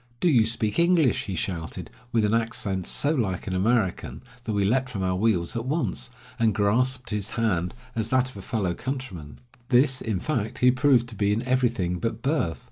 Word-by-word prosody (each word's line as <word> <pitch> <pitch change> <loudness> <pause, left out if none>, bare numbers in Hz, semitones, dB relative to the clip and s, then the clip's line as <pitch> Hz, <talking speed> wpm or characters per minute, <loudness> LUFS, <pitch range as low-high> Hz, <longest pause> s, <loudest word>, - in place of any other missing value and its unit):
"Do 180 - +3
you 115 -6 +5
speak 115 +2 0
English?" 170 -6 +3
he 95 - -4
shouted, 80 -3 -4 0.2
with 115 -2 +2
an 105 - +1
accent 110 -5 -1
so 145 - 0
like 100 - -1
an 95 - -3
American, 100 0 0 0.2
that 110 - -2
we 100 -1 +1
leaped 130 +5 +1
from 100 -6 -4
our 95 0 0
wheels 95 -2 +1
at 115 +1 -3
once, 140 -3 -1 0.3
and 110 -3 +2
grasped 125 +5 +1
his 105 0 -2
hand 90 -5 0 0.2
as 110 -1 -1
that 130 0 +2
of - - -19
a - - -7
fellow 95 -3 -1
countryman. 115 - -6 0.3
This, 130 +1 +4
in 110 -5 -2
fact, 120 -3 -2
he 125 0 +5
proved 130 -2 +3
to 115 - -8
be 100 0 +1
in 110 +4 0
everything 120 -9 0
but 115 - -3
birth. 135 - 0
115 Hz, 200 wpm, -25 LUFS, 95-130 Hz, 0.3 s, you